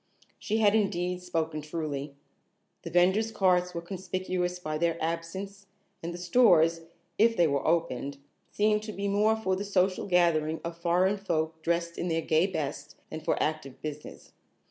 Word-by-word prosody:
She 220 0 -1
had 210 -2 +4
indeed 180 -4 0
spoken 160 -3 -2
truly. 150 -2 -4 0.7
The 170 - -7
vendors' 190 +6 +3
carts 180 -4 +2
were 170 - -4
conspicuous 185 -1 -3
by 155 -3 -4
their 165 0 +1
absence 190 +5 -4 0.3
and 170 - -4
the 175 - -6
stores, 175 -4 +4 0.4
if 230 +1 +4
they 175 - +5
were 140 -3 0
open, 140 -4 0 0.3
seemed 210 0 +2
to 215 0 -7
be 200 +1 -3
more 210 +2 +3
for 190 -4 -1
the 195 - -3
social 190 -2 +1
gathering 160 -4 +2
of 170 0 -5
foreign 180 +4 +2
folk 160 -4 -2
dressed 170 +1 -1
in 175 - -2
their 165 -1 0
gay 160 +4 +3
best, 155 -7 -4 0.2
than - - -4
for - - 0
active 155 -4 -3
business. 150 -1 -8
175 Hz, 165 wpm, -28 LUFS, 160-195 Hz, 0.7 s, they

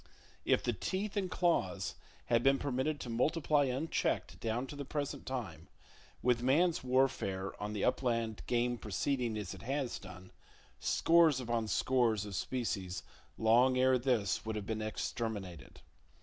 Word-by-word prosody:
If - - +3
the - - 0
teeth 195 +3 -3
and 195 -3 0
claws 100 - 0 0.3
had 120 -1 +3
been 135 +2 +4
permitted 140 +3 -1
to 120 - -6
multiply 145 +4 +2
unchecked 135 +5 -1
down 115 +3 -1
to 140 - -8
the 145 - -5
present 145 +1 -4
time, 130 -3 -5 0.6
with 125 -1 +3
man's 155 +7 +3
warfare 125 -7 +1
on 105 +1 -3
the 105 - -2
upland 115 -4 0
game 120 0 +1
proceeding 115 +3 -1
as 100 -4 -4
it - - -10
has 135 0 -2
done, 95 -1 -11 0.5
scores 165 -5 +4
upon 115 -3 -1
scores 115 -3 +2
of 100 - -7
species 95 -5 -2 0.3
long 120 +4 +4
ere 130 0 +4
this 120 -6 +1
would 110 0 -3
have 105 -2 -4
been 110 0 -3
exterminated. 110 -4 -4
120 Hz, 150 wpm, -33 LUFS, 110-135 Hz, 0.6 s, been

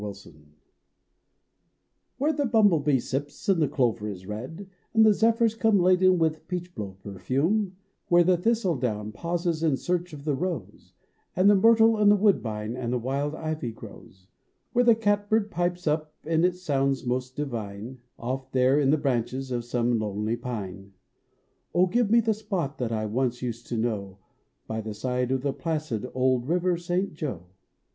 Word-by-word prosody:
JOE 105 -1 -8 1.8
Where 300 +4 +1
the 285 -2 0
bumblebee 175 - +4
sips 140 +3 -5
and 190 -4 +3
the 150 - +3
clover 115 -5 0
is 95 -2 -8
red, 130 - -7 0.3
And 220 0 +7
the 215 - +6
zephyrs 230 +1 +3
come 225 -2 +3
laden 185 +1 +4
with 160 -2 -1
peachblow 170 - -5
perfume, 140 - -1 0.3
Where 175 0 +5
the 180 +1 +4
thistle 190 -3 +1
down 110 -4 -2
pauses 170 - -2
in 155 -5 +2
search 180 +2 -2
of 145 -2 -10
the 150 - +1
rose 155 - -5 0.4
And 190 +3 +5
the - - +5
myrtle 225 +2 +5
and 205 -1 +5
woodbine 115 - +1
and 120 -1 -2
wild 140 +4 -1
ivy 155 -6 -3
grows; 95 -3 -13 0.5
Where 245 0 +4
the 235 -2 +6
cat 205 -2 0
bird 215 -1 +1
pipes 175 0 -1
up 155 0 -1
and 165 +2 +2
it 180 0 +1
sounds 140 -7 -1
most 125 +1 -2
divine 120 -3 -5 0.2
Off 130 +3 -4
there 130 +2 +3
in 140 -2 +2
the 155 - +4
branches 130 -1 -2
of 120 -1 -1
some 120 -1 0
lonely 105 +1 -2
pine. 100 -5 -6 0.8
Oh, 180 +1 +5
give 230 +3 +1
me 230 +2 +5
the 225 0 +1
spot 190 -9 -4
that 120 -3 -2
I 110 -1 -1
once 125 +3 -1
used 120 -1 -5
to 120 - -3
know 105 -4 -2 0.5
Uv 110 0 -3
the 110 -1 -6
side 125 +2 -1
of 130 0 -1
the 140 -1 0
placid 150 -8 -3
old 130 -1 +1
River 180 +2 +1
St. 175 +2 -2
Joe 130 - -5
145 Hz, 165 wpm, -26 LUFS, 120-180 Hz, 1.8 s, And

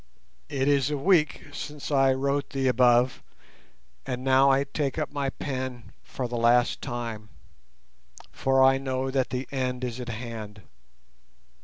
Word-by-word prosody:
It 135 -2 -1
is 140 -1 +3
a 150 - -1
week 155 -1 +2
since 150 0 -6
I 135 -1 +4
wrote 140 +2 -1
the 135 -1 -1
above, 125 0 +3 0.8
and 125 -1 -4
now 135 +1 +5
I 135 +1 +3
take 140 0 -3
up 150 -2 -3
my 140 -1 -1
pen 130 -4 -5
for 125 - -5
the 120 0 -4
last 120 +1 +3
time, 115 -3 -5 1.0
for 135 0 +2
I 135 0 +5
know 130 0 -2
that 130 -1 0
the 130 +1 -4
end 130 -2 -2
is 125 0 -4
at 125 -1 -6
hand. 110 -3 -7
130 Hz, 150 wpm, -26 LUFS, 125-135 Hz, 1.0 s, now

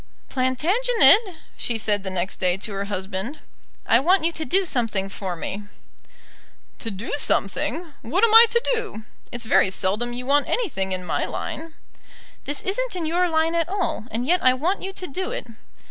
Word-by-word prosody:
"Plantagenet," 365 - +5 0.4
she 235 - -1
said 210 -2 0
the 195 - -5
next 185 0 -3
day 180 -1 +1
to 205 +1 -6
her 200 0 -3
husband, 195 +6 -4 0.5
"I 230 - +4
want 350 +5 +3
you 335 - +2
to 320 - -2
do 380 +5 +1
something 225 - -1
for 190 -2 -5
me." 200 +5 -6 1.1
"To 225 - -4
do 205 +3 -6
something! 305 - -1
What 355 - -1
am 455 -2 +4
I 460 +1 +10
to 470 +1 +2
do? 440 - -4 0.3
It's 240 -1 -4
very 210 - +3
seldom 205 +6 -1
you 245 +1 -5
want 285 +2 +2
anything 230 - -1
in 185 -1 -4
my - - -1
line." 320 0 -6 0.7
"This 290 0 -1
isn't 470 +4 -1
in 345 -3 -3
your 350 +3 +1
line 320 0 +1
at 335 0 0
all, 375 - -2
and 230 +3 -3
yet 355 +5 +2
I 255 0 +5
want 345 +9 -1
you 385 - -4
to 375 - -5
do 370 +5 -4
it." - - -5
270 Hz, 185 wpm, -23 LUFS, -, 1.1 s, I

